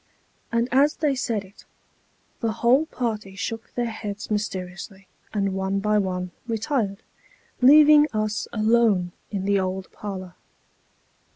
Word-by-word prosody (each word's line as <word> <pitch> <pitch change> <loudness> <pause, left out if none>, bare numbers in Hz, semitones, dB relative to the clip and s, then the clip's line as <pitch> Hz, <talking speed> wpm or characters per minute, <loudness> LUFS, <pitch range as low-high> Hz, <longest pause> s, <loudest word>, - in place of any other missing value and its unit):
And 235 +1 +1
as 280 +4 +4
they 300 -3 +1
said 235 -6 -2
it, 190 +2 -18 0.8
the 225 -1 -1
whole 250 +7 +3
party 215 -8 -4
shook 225 +3 -5
their 245 - 0
heads 210 -1 -6
mysteriously, 190 -1 -4 0.2
and 200 -2 0
one 190 +1 -1
by 210 +1 +2
one 180 -2 -2 0.2
retired, 225 -3 -1 0.6
leaving 300 +3 +8
us 215 -1 -2
alone 215 -5 +2 0.2
in 195 -2 -3
the 200 0 +2
old 185 0 -3
parlour. 185 -3 -7
210 Hz, 125 wpm, -24 LUFS, 195-235 Hz, 0.8 s, leaving